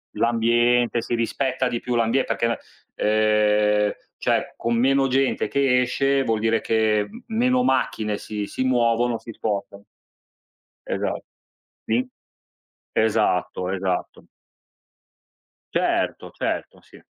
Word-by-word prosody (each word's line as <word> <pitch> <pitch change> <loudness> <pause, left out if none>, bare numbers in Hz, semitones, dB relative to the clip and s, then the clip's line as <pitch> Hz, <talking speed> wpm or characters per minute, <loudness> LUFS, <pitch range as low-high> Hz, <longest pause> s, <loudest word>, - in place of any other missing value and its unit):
L'ambiente, 120 +1 +2
si 120 - -2
rispetta 130 +3 -1
di 120 -1 -2
più 125 -1 -3
l'ambie 115 +3 +2
perché - - -1
la 115 - 0 0.4
ehm, 105 -1 +3 0.3
cioè, - - 0
con 115 0 -1
meno 135 +3 +3
gente 135 +1 +1
che 135 -2 +2
esce, 135 +2 +1
vuol 115 -3 0
dire 115 0 +1
che 110 -2 +1
m 225 - -11 0.2
meno 255 +2 +3
macchine 110 - 0
si 105 -1 -4
si 130 - -3
muovono, 120 -2 +2
si 115 - -10
spostano. 100 -1 -4 1.0
Esatt - - -2 0.6
sì 120 +4 0 0.9
esatto, 95 -4 +1
esatto. 95 -1 -3 1.5
Certo, - - 0
certo, - - -4
sì. - - -18
115 Hz, 115 wpm, -23 LUFS, 105-125 Hz, 1.5 s, ehm